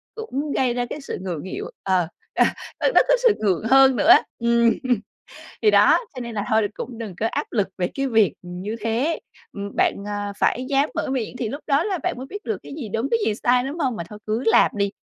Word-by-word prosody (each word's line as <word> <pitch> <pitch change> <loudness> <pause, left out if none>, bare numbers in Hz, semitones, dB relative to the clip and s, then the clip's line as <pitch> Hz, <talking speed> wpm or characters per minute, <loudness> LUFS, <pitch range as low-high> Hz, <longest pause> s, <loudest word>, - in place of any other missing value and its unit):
cũng 300 - -4
gây 250 -2 +2
ra 245 0 -1
cái 295 - -6
sự - - -5
ngượng 175 -6 -4
nghịu. 190 - -5 0.2
Ờ. 185 -3 +1 0.3
À, - - +3 0.3
nó - - +4
có - - +4
sự 465 -4 +6
ngượng 195 -4 +1
hơn 270 -1 +6
nữa 295 - +1
á. 355 - +9 0.2
Ừm. 235 0 +3 0.9
Thì 425 - +6
đó, - - +6 0.2
cho 255 - -6
nên 235 -2 -6
là 205 -1 -2
thôi 220 -1 +3
cũng 240 -3 -7
đừng 215 -5 -6
có 225 - +2
áp - - -2
lực 205 -5 0
về 180 -1 0
cái 275 0 -1
việc, 220 -4 +3
ừm, 180 0 -8
như 215 +3 -4
thế. 235 +9 0 0.3
Ừm, 200 0 -6
bạn, - - +3
à, 205 -1 -3
phải 255 +1 +1
dám 280 +1 +2
mở - - -2
miệng 250 -2 -3
thì 230 -3 -2
lúc 285 +6 -5
đó 285 +2 +2
là 385 -4 -1
bạn - - -1
mới 260 +2 -7
biết 410 +8 -8
được - - -2
cái - - -10
gì 260 -8 -5
đúng 225 +6 -2
cái 465 - +3
gì - - +2
sai, 245 0 +4
đúng 280 +5 -5
hông? 260 -8 0
Mà 170 - -4
thôi 210 - -10
cứ 220 +3 -1
làm - - +5
đi. 200 -1 0
235 Hz, 245 wpm, -23 LUFS, 210-275 Hz, 0.9 s, á